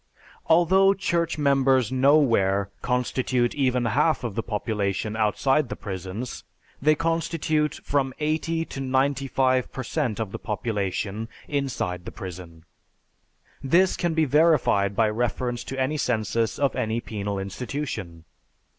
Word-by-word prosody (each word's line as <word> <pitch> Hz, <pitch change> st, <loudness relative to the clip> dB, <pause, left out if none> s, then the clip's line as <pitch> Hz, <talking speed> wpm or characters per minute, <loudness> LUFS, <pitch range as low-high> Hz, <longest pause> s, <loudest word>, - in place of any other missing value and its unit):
_ -, -, -30 dB, 0.2 s
Although 190 Hz, +4 st, +5 dB
church 170 Hz, -4 st, -1 dB
members 135 Hz, -4 st, +3 dB
nowhere 115 Hz, -8 st, +3 dB
constitute 125 Hz, 0 st, 0 dB
even 125 Hz, -3 st, +1 dB
half 145 Hz, +8 st, +2 dB
the 115 Hz, -3 st, -3 dB
population 105 Hz, -1 st, -2 dB
outside 125 Hz, +6 st, +1 dB
the -, -, -4 dB
prisons, 95 Hz, +5 st, -6 dB, 0.4 s
they 155 Hz, +2 st, +4 dB
constitute 160 Hz, -2 st, 0 dB
from 135 Hz, -2 st, 0 dB
eighty 160 Hz, +2 st, -1 dB
to 135 Hz, -, -8 dB
ninety 135 Hz, +1 st, 0 dB
five 130 Hz, -1 st, +1 dB
per 130 Hz, -, -5 dB
cent 125 Hz, -4 st, -2 dB
of 110 Hz, -4 st, -3 dB
the -, -, -6 dB
population 105 Hz, -1 st, -3 dB, 0.2 s
inside 125 Hz, -, -2 dB
the -, -, -6 dB
prison. 85 Hz, -3 st, -9 dB, 1.0 s
This 180 Hz, +7 st, +3 dB
can 170 Hz, -3 st, -1 dB
be 160 Hz, -1 st, +3 dB
verified 140 Hz, -, +3 dB
by 110 Hz, +1 st, +3 dB
reference 120 Hz, +2 st, -2 dB
to 135 Hz, -, -5 dB
any 135 Hz, +4 st, 0 dB
census 115 Hz, -3 st, 0 dB
of 140 Hz, -1 st, +1 dB
any 115 Hz, -2 st, -1 dB
penal 100 Hz, -3 st, -4 dB
institution. 95 Hz, -, -5 dB
125 Hz, 130 wpm, -25 LUFS, 105-150 Hz, 1.0 s, Although